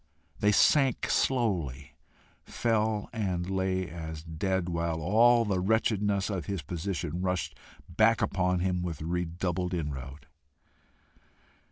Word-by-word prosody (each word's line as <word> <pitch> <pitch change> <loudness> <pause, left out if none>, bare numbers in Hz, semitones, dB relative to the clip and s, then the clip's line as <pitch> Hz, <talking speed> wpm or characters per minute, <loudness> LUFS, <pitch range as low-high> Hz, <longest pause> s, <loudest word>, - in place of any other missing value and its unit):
They 105 - +3
sank 135 +4 +3
slowly, 80 - 0 0.5
fell, 110 -2 0
and 95 -6 -2
lay 95 -1 -1
as 80 -1 -7
dead, 90 +3 -2
while 85 -1 -1
all 115 +7 +4
the 100 -3 0
wretchedness 105 0 +1
of 90 -7 -4
his 95 -6 -3
position 85 +1 -3
rushed 90 -1 -2 0.3
back 110 +6 +3
upon 90 -1 +1
him 90 -1 0
with 85 -4 -4
redoubled 90 +1 -2
inroad. 70 -3 -5
90 Hz, 115 wpm, -29 LUFS, 85-105 Hz, 0.5 s, all